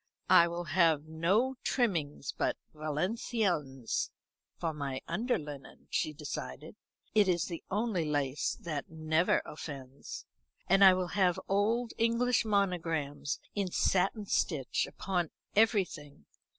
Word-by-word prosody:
"I 170 - +8
will 170 +1 -3
have 165 -2 +3
no 190 +12 +1
trimming 170 - 0
but - - 0 0.2
Valenciennes 155 - -1 0.5
for 165 -2 -2
my 140 -3 -3
under 230 +9 0
linen," 145 -3 -10
she 155 - 0
decided; 70 - -6 0.4
"it 210 -2 +5
is 175 -3 +2
the 170 -3 -6
only 210 -3 0
lace 145 -2 -1
that 155 -4 -4
never 160 +1 +1
offends. 140 -3 -8 0.4
And 195 +2 +5
I 190 -1 +9
will 180 -1 -1
have 185 -3 +2
old 225 +5 +1
English 235 +2 +3
monograms 165 -8 0
in 200 -3 -1
satin 195 +4 +1
stitch 150 -8 0
upon 180 -4 -2 0.3
everything. 185 - +1
170 Hz, 120 wpm, -31 LUFS, 150-200 Hz, 0.5 s, I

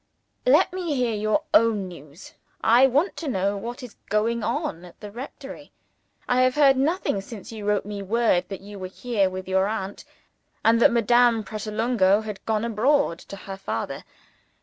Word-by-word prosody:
Let - - +4
me 350 -5 -2
hear 245 -3 0
your 215 +8 0
own 215 -4 +3
news 155 -1 -13 0.3
I 240 +4 +6
want 290 +9 +1
to 325 - -5
know 200 -4 0
what 240 +6 -6
is 240 -4 -11
going 225 +3 +1
on 175 -4 -2
at 180 - -14
the 210 -2 -9
rectory. 275 +4 -9 0.6
I 250 +1 +3
have 255 0 +3
heard 280 -2 +5
nothing 275 - 0
since 205 0 -10
you 215 -2 -7
wrote 205 -1 +1
me 205 -1 -5
word 195 -3 +1
that 195 -2 -6
you 200 0 -10
were 185 - -5
here 200 0 -1
with 185 0 -7
your 190 +1 +2
aunt, 205 -2 -4 0.6
and 230 +1 +4
that - - +6
Madame 235 0 +3
Pratolungo 215 -1 +1
had 210 -2 -7
gone 220 0 0
abroad 235 - +1
to - - -10
her 195 0 -8
father. 195 - -4
215 Hz, 175 wpm, -24 LUFS, 195-245 Hz, 0.6 s, I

